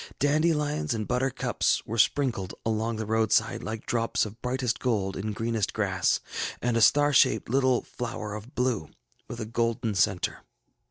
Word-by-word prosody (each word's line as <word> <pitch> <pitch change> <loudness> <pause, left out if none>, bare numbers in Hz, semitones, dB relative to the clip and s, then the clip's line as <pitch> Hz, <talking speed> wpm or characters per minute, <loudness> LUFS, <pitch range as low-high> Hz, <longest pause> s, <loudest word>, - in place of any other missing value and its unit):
Dandelions 150 -2 +1
and 110 -2 -3
butterflies 125 +1 0
were 115 +2 -3
sprinkled 115 -6 +1
along 110 +1 0
the 110 0 -3
roadside 110 +1 +1
like 110 -1 -5
drops 115 -1 0
of 110 +2 -10
brightest 125 -1 -1
gold 100 -6 0
in 105 +3 -3
greenest 115 -1 -2
grass, 95 -4 +1 0.4
and 120 -1 0
a 115 - +2
star 145 +5 +5
shaped 110 -4 +4
little 130 0 +2
flower 110 -3 -5
of 105 +5 -9
blue, 125 - 0 0.4
with 120 - -7
a 110 - -3
golden 115 0 -1
centre. 95 -2 +1
115 Hz, 155 wpm, -27 LUFS, 110-125 Hz, 0.4 s, star